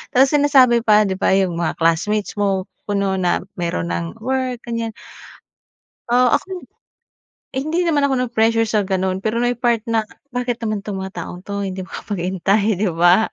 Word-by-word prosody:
tas 265 Hz, +2 st, +5 dB
sinasabi 275 Hz, -5 st, +5 dB
pa, 215 Hz, -2 st, +5 dB
’di 190 Hz, -2 st, -2 dB
ba, 190 Hz, -, +3 dB
’yong 185 Hz, -3 st, +1 dB
mga 170 Hz, -, -1 dB
classmates 195 Hz, +6 st, 0 dB
mo 195 Hz, -2 st, +1 dB, 0.3 s
ko 205 Hz, -, 0 dB
no'n 195 Hz, -1 st, 0 dB
na 180 Hz, -1 st, +1 dB, 0.2 s
meron 85 Hz, -, -2 dB
ng 85 Hz, -1 st, -4 dB
work, 255 Hz, -2 st, -2 dB
ganyan. 230 Hz, -2 st, -4 dB, 1.1 s
Ah, 245 Hz, 0 st, +4 dB
ako -, -, -15 dB
naman, 360 Hz, -, -8 dB, 0.9 s
eh, 265 Hz, -, 0 dB
hindi 330 Hz, +3 st, 0 dB
naman 300 Hz, -5 st, +2 dB
ako 270 Hz, -, 0 dB
na-pressure 225 Hz, -1 st, +2 dB
sa 210 Hz, -2 st, 0 dB
gano’n. 190 Hz, -1 st, 0 dB
Pero 220 Hz, +4 st, -1 dB
may 245 Hz, -1 st, 0 dB
part 235 Hz, -2 st, +1 dB
na, 225 Hz, -1 st, +2 dB, 0.3 s
bakit 245 Hz, -2 st, -3 dB
naman 215 Hz, -2 st, -2 dB
’tong 200 Hz, -2 st, -3 dB
mga 190 Hz, 0 st, -6 dB
taong 180 Hz, +2 st, -8 dB
’to, 200 Hz, +1 st, -4 dB
hindi 190 Hz, 0 st, -5 dB
magkapaghintay, 195 Hz, +2 st, -1 dB
’di 200 Hz, -2 st, +1 dB
ba? 175 Hz, +6 st, +5 dB
210 Hz, 180 wpm, -20 LUFS, 190-240 Hz, 1.1 s, tas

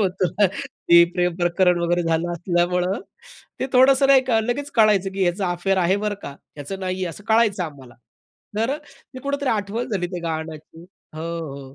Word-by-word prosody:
होतो 185 Hz, -2 st, +1 dB
ना, 205 Hz, -, +6 dB
ते 170 Hz, -11 st, +4 dB
प्रेम 180 Hz, -1 st, 0 dB
प्रकरण 180 Hz, 0 st, +2 dB
वगैरे 175 Hz, +1 st, +1 dB
झालं 165 Hz, +1 st, 0 dB
असल्यामुळं, 180 Hz, +2 st, 0 dB, 0.6 s
ते -, -, 0 dB
थोडंसं 265 Hz, +1 st, +5 dB
नाही 275 Hz, -1 st, +6 dB, 0.3 s
लगेच 285 Hz, +3 st, -2 dB
कळायचं, 210 Hz, -4 st, +4 dB
की 195 Hz, -, -2 dB
ह्याचा 180 Hz, +1 st, 0 dB
अफेअर 190 Hz, +2 st, 0 dB
आहे 185 Hz, +2 st, +2 dB
बरं 210 Hz, 0 st, -2 dB
का, -, -, -6 dB, 0.3 s
ह्याचं 170 Hz, +7 st, -6 dB
नाहीये 185 Hz, 0 st, -2 dB
असं 195 Hz, +4 st, -10 dB
कळायचं 220 Hz, -4 st, +3 dB
आम्हाला. 135 Hz, -6 st, -11 dB, 0.6 s
तर 240 Hz, +7 st, 0 dB
ते 260 Hz, -, -15 dB
कुठेतरी 280 Hz, -1 st, -2 dB
आठवण 220 Hz, +3 st, -2 dB
झाली 180 Hz, -4 st, -1 dB
त्या 180 Hz, -, -4 dB
गाण्याची 160 Hz, -1 st, -6 dB, 0.4 s
हो, 160 Hz, -, -5 dB
हो. 145 Hz, -5 st, -6 dB
185 Hz, 170 wpm, -22 LUFS, 170-215 Hz, 0.6 s, ना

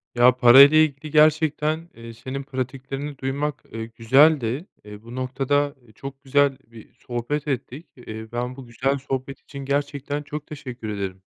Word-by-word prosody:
Ya, 120 Hz, +1 st, +6 dB
para 125 Hz, +1 st, +9 dB
ile 155 Hz, +3 st, +8 dB
ilgili 145 Hz, 0 st, -8 dB
gerçekten, 155 Hz, +1 st, +2 dB
eee, 115 Hz, 0 st, -10 dB
senin 130 Hz, +4 st, -6 dB
pratiklerini 135 Hz, +1 st, -5 dB
duymak, 140 Hz, +2 st, -3 dB
eee, 115 Hz, 0 st, -5 dB
güzeldi. 130 Hz, -, +3 dB, 0.2 s
Eee, 105 Hz, 0 st, -11 dB
bu 115 Hz, +1 st, -10 dB
noktada, 135 Hz, +3 st, 0 dB
eee, 110 Hz, -, -20 dB
çok 135 Hz, +4 st, -9 dB
güzel 140 Hz, 0 st, +2 dB
bir 115 Hz, -2 st, -15 dB
sohbet 130 Hz, +5 st, -4 dB
ettik. 140 Hz, +3 st, -4 dB
Eee, 110 Hz, -3 st, -9 dB
ben 125 Hz, +1 st, -3 dB
bu 135 Hz, -1 st, -10 dB
güzel 130 Hz, +4 st, -1 dB
sohbet 135 Hz, 0 st, -5 dB
için 140 Hz, -1 st, -9 dB
gerçekten 145 Hz, +1 st, -2 dB
çok 150 Hz, +1 st, -7 dB
teşekkür 125 Hz, -6 st, -7 dB
ederim 95 Hz, -2 st, -5 dB
135 Hz, 160 wpm, -23 LUFS, 120-145 Hz, 0.2 s, para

